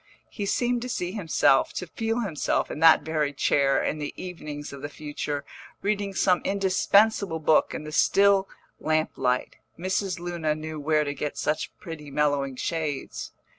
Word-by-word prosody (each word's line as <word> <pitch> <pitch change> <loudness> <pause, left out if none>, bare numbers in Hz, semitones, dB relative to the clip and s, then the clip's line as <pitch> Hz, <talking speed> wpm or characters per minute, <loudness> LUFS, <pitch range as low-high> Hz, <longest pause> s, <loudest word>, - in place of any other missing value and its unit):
He 205 -2 -4
seemed 245 +3 +1
to 250 - -5
see 180 -6 -2
himself, 165 -8 +2
to - - -4
feel 225 +6 -2
himself, 185 -9 -1
in - - -5
that 160 0 +7
very 155 -2 0
chair, 140 -1 +2
in 155 - -1
the 145 -1 -5
evenings 150 -6 -7
of 140 - -9
the 145 - -5
future, 145 -1 -4 0.4
reading 200 -1 -1
some 180 0 +3
indispensable 200 -1 +3
book 155 0 +3
in - - -5
the 155 - -7
still 195 +3 +4 0.3
lamp 155 0 +1
light 125 -1 -1 0.2
Mrs. 185 +1 -1
Luna 170 -3 -1
knew 155 0 -6
where 150 +1 +2
to 145 -1 -3
get 145 0 -4
such 150 - -1
pretty 155 -3 -8
mellowing 145 -2 0
shades. 155 0 -3
160 Hz, 165 wpm, -26 LUFS, 150-195 Hz, 0.4 s, that